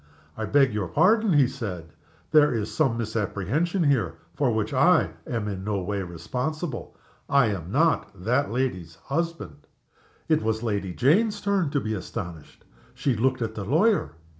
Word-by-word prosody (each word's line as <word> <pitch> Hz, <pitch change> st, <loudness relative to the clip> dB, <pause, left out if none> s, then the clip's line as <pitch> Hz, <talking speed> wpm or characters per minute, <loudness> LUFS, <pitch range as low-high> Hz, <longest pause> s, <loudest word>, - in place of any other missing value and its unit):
"I -, -, -3 dB
beg 140 Hz, -4 st, +3 dB
your 105 Hz, -4 st, -1 dB
pardon," 215 Hz, -, +3 dB
he 140 Hz, -4 st, +5 dB
said. 100 Hz, -, -6 dB, 0.4 s
"There 150 Hz, -2 st, +6 dB
is 110 Hz, -3 st, -2 dB
some 135 Hz, -7 st, +1 dB
misapprehension 115 Hz, -, -1 dB
here, 115 Hz, -, +1 dB, 0.2 s
for 135 Hz, -4 st, +1 dB
which 110 Hz, +1 st, -1 dB
I 175 Hz, +7 st, +4 dB, 0.2 s
am 115 Hz, -7 st, -2 dB
in 95 Hz, -2 st, -4 dB
no 105 Hz, -1 st, -1 dB
way 100 Hz, +1 st, -2 dB
responsible. 125 Hz, -, -4 dB, 0.3 s
I 140 Hz, -5 st, +4 dB
am 90 Hz, -3 st, -4 dB
not 160 Hz, -2 st, +2 dB
that 125 Hz, +7 st, +1 dB
lady's 95 Hz, -10 st, -2 dB
husband." 160 Hz, -, -4 dB, 0.6 s
It 155 Hz, -1 st, +3 dB
was 110 Hz, +1 st, -1 dB
Lady 100 Hz, -5 st, -2 dB
Jane's 205 Hz, -, +2 dB
turn 200 Hz, -6 st, +1 dB
to 140 Hz, -, 0 dB
be 110 Hz, -4 st, -3 dB
astonished. 90 Hz, -5 st, -7 dB, 0.3 s
She 135 Hz, 0 st, 0 dB
looked 130 Hz, +2 st, +1 dB
at 110 Hz, -1 st, -3 dB
the 105 Hz, -, -5 dB
lawyer. 160 Hz, -, +2 dB
120 Hz, 160 wpm, -25 LUFS, 100-150 Hz, 0.6 s, There